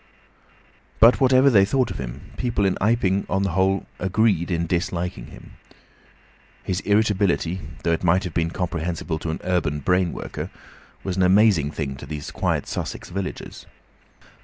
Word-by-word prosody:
But 115 +4 +6
whatever 130 +1 +5
they 100 -4 +6
thought 130 +6 +1
of - - -6
him, 65 +1 -7
people 115 -5 0
in 95 - +2
Iping, 100 -3 +1
on 95 +1 +1
the 95 - 0
whole, 95 +2 +1
agreed 95 -2 +1
in 85 -2 0
disliking 85 -6 -2
him. - - -14 1.1
His 90 -1 -2
irritability, 100 -4 +1 0.2
though 85 - +1
it 80 - -2
might 90 +2 +3
have 90 -4 -5
been 85 +1 0
comprehensible 85 -2 -3
to 85 - -4
an 80 - -3
urban 85 -5 0
brain 90 +3 +2
worker, - - -6 0.5
was 95 -1 -3
an - - +2
amazing 95 -5 +4
thing 70 -3 -4
to 70 - -10
these 75 -1 -6
quiet - - -1
Sussex - - -5
villagers. 95 +1 -6
90 Hz, 160 wpm, -23 LUFS, 85-100 Hz, 1.1 s, But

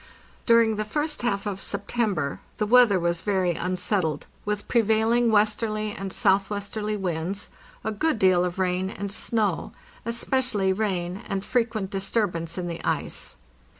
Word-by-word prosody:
During 230 -2 +5
the 215 - 0
first 295 +8 -2
half 205 -5 -1
of 195 -2 -3
September 200 -7 -1 0.2
the 210 - +1
weather 230 -3 +6
was 170 -1 0
very 190 -4 +1
un 180 +2 -2
settled, 180 -6 0 0.2
with 210 0 -2
prevailing 230 +1 +3
westerly 215 0 +1
and 195 -1 -5
southwesterly 205 +2 0
winds, 185 +1 -3 0.3
a 220 - -1
good 280 +6 0
deal 185 -3 +4
of 180 0 -2
rain 185 0 0
and 200 0 -5
snow, 220 0 -1 0.3
especially 230 -4 0
rain, 185 -3 -2
and 195 0 -2
frequent 225 -5 0
disturbance 195 -4 -1
in 180 -1 -2
the 170 -1 -5
ice. - - -2
205 Hz, 145 wpm, -25 LUFS, 185-220 Hz, 0.3 s, weather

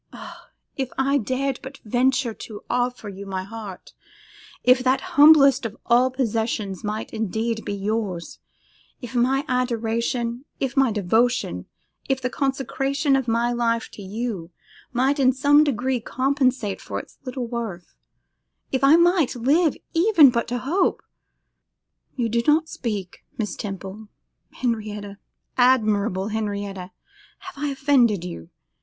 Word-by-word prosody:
Ah! - - -11 0.3
if 265 -2 -2
I 275 +2 +2
dared 260 +3 -2
but 270 +1 -9
venture 250 +2 +1
to 215 -1 -10
offer 245 -2 -1
you 200 0 -8
my 190 -1 -3
heart, 205 -2 -9 0.7
if 250 0 +5
that 260 +1 +3
humblest 285 -4 +7
of 225 -1 -5
all 245 +2 +4
possessions 225 -5 -2
might 210 +1 -4
indeed 220 +1 -2
be 200 - -3
yours, 200 -3 -3 0.6
if 245 -1 -8
my 260 +3 +2
adoration, 235 0 -1
if 265 -3 -2
my 270 -3 +4
devotion, 220 +5 0 0.4
if 270 -1 +1
the 255 -1 -3
consecration 275 +1 0
of 265 -2 0
my 235 +1 +1
life 230 -1 0
to - - -11
you, 200 -3 -4 0.4
might 265 +4 +1
in 260 -1 +5
some 285 +3 +4
degree 260 -2 0
compensate 255 -3 0
for - - -5
its - - -13
little 255 -1 -4
worth, 230 -7 -6 0.8
if 265 - -1
I 280 +3 +7
might 340 -5 +3
live 290 +6 +2 0.2
even 330 - +6
but 235 -1 -1
to 245 +1 -2
hope 330 +10 0 1.1
'You 245 -4 0
do 235 +1 +1
not 315 +2 +4
speak. 205 -6 -5
Miss 215 -3 -3
Temple, 195 +1 -7 0.4
Henrietta, 210 -4 -4 0.4
admirable 215 -6 +2
Henrietta, 200 -4 -4 0.5
have 375 -2 -10
I - - +1
offended 265 - +2
you? 130 - -8
240 Hz, 135 wpm, -23 LUFS, 215-270 Hz, 1.1 s, humblest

